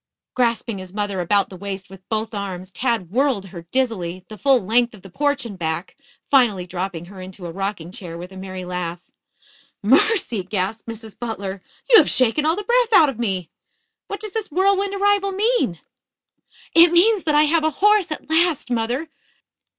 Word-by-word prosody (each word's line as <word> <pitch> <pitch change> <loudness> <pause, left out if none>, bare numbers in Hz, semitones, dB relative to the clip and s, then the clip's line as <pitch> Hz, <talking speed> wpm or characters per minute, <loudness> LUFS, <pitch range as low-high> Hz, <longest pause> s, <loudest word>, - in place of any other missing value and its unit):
Grasping 235 -4 0
his 185 -1 -10
mother 205 -3 -2
about 200 +3 +2
the 190 - -10
waist 195 0 -6
with 190 -1 -15
both 220 0 -2
arms, 190 -2 -5
Tad 230 -7 -1
whirled 255 -4 +1
her 170 -3 -11
dizzily, 185 -9 -1
the 215 - -9
full 270 -2 +4
length 235 +3 +1
of 190 - -17
the 195 - -13
porch 285 +2 0
and 200 -5 -8
back, 160 +2 -3 0.4
finally 230 -10 +3
dropping 180 -1 -5
her 190 +1 -11
into 185 0 -9
a 170 - -5
rocking 190 -2 -4
chair 180 -6 -7
with 180 +2 -9
a - - -12
merry 185 -1 -7
laugh. 180 -1 -4 0.8
"Mercy!" 260 - +4
gasped 190 +4 -3
Mrs. 225 -1 -9
Butler. 200 -5 -5 0.3
"You - - +8
have 315 - +3
shaken 260 +5 +3
all 320 - +3
the 420 - -4
breath 475 +1 +2
out 315 -7 +7
of 250 -4 -6
me. 190 -7 -2 0.6
What 405 - -5
does 425 0 -7
this 440 0 -4
whirlwind 395 +3 +1
arrival 400 0 +2
mean?" 395 - +1 0.9
"It 335 0 +8
means 390 +3 +4
that 305 -2 +2
I 300 - +6
have 310 +1 +2
a 315 - +3
horse 410 +3 +2
at 305 - -6
last, 320 -4 +2
mother. 240 +6 -1
225 Hz, 185 wpm, -21 LUFS, 185-310 Hz, 0.9 s, You